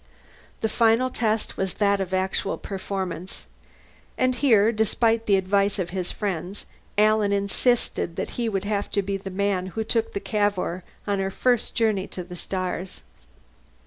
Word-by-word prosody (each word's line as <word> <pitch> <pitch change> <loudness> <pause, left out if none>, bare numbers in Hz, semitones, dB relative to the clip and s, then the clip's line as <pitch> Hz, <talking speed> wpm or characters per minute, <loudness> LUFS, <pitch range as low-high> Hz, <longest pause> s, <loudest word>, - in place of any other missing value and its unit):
The 220 - +2
final 230 +3 +3
test 220 -2 -1
was 190 -1 -2
that 200 -1 +2
of 190 -1 -3
actual 190 +1 0
performance. 190 -2 -5 0.7
And 255 0 +3
here, 230 -5 +4
despite 225 +1 +1
the 200 - +5
advice 200 +2 +2
of 180 -3 -2
his 185 -1 -2
friends, 195 -1 -4 0.3
Alan 215 -1 +4
insisted 200 -2 0
that - - -3
he 235 -2 -1
would 195 -2 -2
have 205 -1 -1
to 200 - +2
be 195 0 -1
the 195 0 -7
man 190 -1 0
who 220 - +1
took 225 0 0
the - - -1
Cavour 200 -4 0 0.2
on 200 -1 0
her 195 0 0
first 245 +4 +1
journey 215 -4 +1
to 180 - -6
the 180 0 -9
stars. 185 0 -4
200 Hz, 160 wpm, -25 LUFS, 190-220 Hz, 0.7 s, the